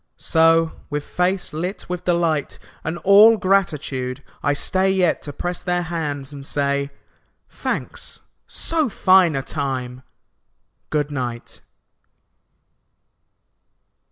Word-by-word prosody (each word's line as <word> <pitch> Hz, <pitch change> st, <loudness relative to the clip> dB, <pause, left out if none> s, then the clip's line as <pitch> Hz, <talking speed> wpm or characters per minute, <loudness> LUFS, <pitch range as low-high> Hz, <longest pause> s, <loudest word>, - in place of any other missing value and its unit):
So, 165 Hz, 0 st, +3 dB, 0.2 s
with 145 Hz, -1 st, -3 dB
face 180 Hz, +2 st, -1 dB
lit 180 Hz, +6 st, -4 dB
with 180 Hz, 0 st, -5 dB
delight 170 Hz, -4 st, 0 dB, 0.3 s
And 160 Hz, +2 st, -3 dB
all 210 Hz, +3 st, +7 dB
gratitude, 150 Hz, -9 st, 0 dB, 0.2 s
I 145 Hz, -, +1 dB
stay 185 Hz, +6 st, +1 dB
Yet 185 Hz, -3 st, +2 dB
to 145 Hz, -, -6 dB
press 175 Hz, +5 st, -4 dB
their 175 Hz, -1 st, 0 dB
hands 150 Hz, -5 st, -4 dB
and 140 Hz, -1 st, -8 dB
say, 140 Hz, 0 st, 0 dB, 0.6 s
"Thanks. -, -, -4 dB, 0.3 s
So 320 Hz, -5 st, 0 dB
fine 185 Hz, -5 st, +4 dB
a 135 Hz, -, -2 dB
time! 130 Hz, -4 st, -4 dB, 0.9 s
Good 150 Hz, -1 st, -1 dB
night. 120 Hz, -4 st, -5 dB
160 Hz, 105 wpm, -21 LUFS, 140-180 Hz, 0.9 s, all